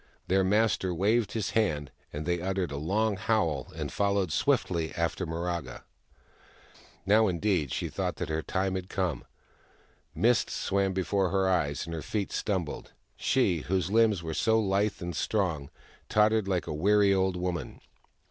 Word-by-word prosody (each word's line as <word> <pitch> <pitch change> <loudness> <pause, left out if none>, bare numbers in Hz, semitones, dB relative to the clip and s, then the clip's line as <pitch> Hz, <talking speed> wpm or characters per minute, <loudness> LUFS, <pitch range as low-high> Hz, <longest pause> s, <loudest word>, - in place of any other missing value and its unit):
Their 95 +1 +3
master 95 -2 +2
waved 105 +4 +1
his 110 -1 -2
hand, 75 -11 0 0.2
and 75 +1 -5
they 85 0 0
uttered 95 -2 -1
a - - -4
long 100 +7 0
howl 85 - 0
and - - -4
followed 100 -4 +1
swiftly 80 +2 +1
after 85 +2 -1
Miraga. 85 0 -4 1.2
Now, 110 +2 +5
indeed, 90 -6 0
she - - -2
thought - - -3
that - - -4
her 80 0 -1
end 95 0 +1
had 95 0 -5
come. 90 -5 -2 0.9
Mists 120 +1 +2
swam 100 -1 0
before 95 0 0
her 95 0 +1
eyes, 80 -6 0
and 85 - -6
her 80 - -4
feet 105 +2 -3
stumbled: 95 -7 -3 0.2
she, 110 -10 +1
whose 95 +3 -1
limbs 110 -5 +3
were 80 -1 -4
so 110 +7 +2
lithe 100 -1 0
and 85 -1 -4
strong, 85 -10 -1 0.4
tottered 105 -1 +3
like 90 -3 0
a - - -4
weary 100 +5 +4
old 95 -1 +1
woman. 90 -1 -4
95 Hz, 155 wpm, -29 LUFS, 85-105 Hz, 1.2 s, Now